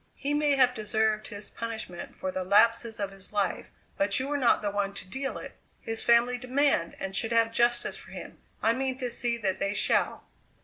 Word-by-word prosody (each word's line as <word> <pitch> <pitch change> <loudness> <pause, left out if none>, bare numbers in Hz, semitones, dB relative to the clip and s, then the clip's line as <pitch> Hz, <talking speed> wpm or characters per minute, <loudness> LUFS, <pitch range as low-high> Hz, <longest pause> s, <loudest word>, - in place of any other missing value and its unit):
"He 285 +1 -2
may 295 -1 +3
have 255 -2 +4
deserved 215 -1 0
his 205 -2 -8
punishment 220 -7 -6
for 185 - -3
the 185 0 -3
lapses 225 +3 +3
of 200 -1 -2
his 195 -1 -10
life 200 -3 -1 0.3
but 200 +3 +2
you 260 - -2
were 290 - -1
not 255 -6 +3
the 205 - 0
one 200 -1 -2
to 185 - -4
deal 265 +7 -3
it. - - -9 0.2
His 225 0 -2
family 240 +1 +4
demand 255 -8 +1
and 195 0 -4
should 225 +3 0
have 230 -1 +3
justice 240 +1 +1
for - - -11
him - - -9 0.2
I 225 - +4
mean 260 +1 -2
to 250 -2 -3
see 235 0 0
that 195 -5 -1
they 200 +1 -1
shall. - - +1
230 Hz, 210 wpm, -28 LUFS, 200-250 Hz, 0.3 s, have